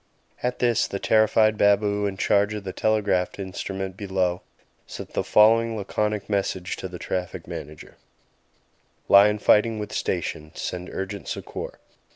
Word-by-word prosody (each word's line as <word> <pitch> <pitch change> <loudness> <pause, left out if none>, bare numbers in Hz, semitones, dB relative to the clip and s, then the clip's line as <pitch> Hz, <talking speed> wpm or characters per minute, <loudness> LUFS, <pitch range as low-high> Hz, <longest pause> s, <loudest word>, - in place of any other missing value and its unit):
At 125 0 -1
this 120 -3 +2
the 100 - -4
terrified 110 +1 +3
baboo 100 0 +3
in 95 -1 -5
charge 100 +2 +2
of 105 - -6
the 95 -1 -5
telegraph 105 -4 0
instrument 95 0 -5
below 95 -3 -1 0.5
sent - - -9
the - - 0
following 115 +1 +4
laconic 105 +1 -2
message 95 -3 -1
to - - -5
the 90 -1 -8
Traffic 90 -1 -4
Manager: 80 -3 -9 1.1
"Lion 105 +2 +7
fighting 110 +2 +3
with 105 -1 -5
station. 75 0 -3
Send 90 0 -5
urgent 95 +1 -5
succour." - - -6
100 Hz, 140 wpm, -24 LUFS, 95-105 Hz, 1.1 s, Lion